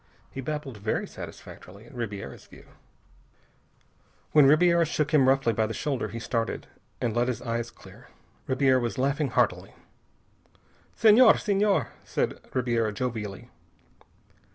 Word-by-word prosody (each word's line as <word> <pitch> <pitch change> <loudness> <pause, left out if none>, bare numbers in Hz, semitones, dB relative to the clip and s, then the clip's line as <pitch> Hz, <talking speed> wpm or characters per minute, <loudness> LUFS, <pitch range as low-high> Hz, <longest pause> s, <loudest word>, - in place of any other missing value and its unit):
He 135 - -6
babbled 145 -3 -5
very 105 +2 -2
satisfactorily, 100 +5 -11
in - - -16
Ribiera's 105 -5 -6
view. - - -16 1.7
When 150 -3 +6
Ribiera 170 +3 +5
shook 150 -1 -1
him 135 -4 +5
roughly 135 -3 +2
by 110 0 0
the 110 - -5
shoulder 135 -7 -2
he 110 +3 -7
started, 115 0 -3 0.3
and 115 -2 -2
let 120 +1 +1
his 125 -4 -2
eyes 115 0 -3
clear. - - -16 0.4
Ribiera 130 0 +3
was 120 -2 -3
laughing 140 +3 0
heartily. - - 0 1.2
"Senhor! 225 +2 +6
Senhor!" 200 - +1
said - - -2
Ribiera 120 -4 0
jovially. 105 -3 -5
130 Hz, 130 wpm, -26 LUFS, 115-150 Hz, 1.7 s, When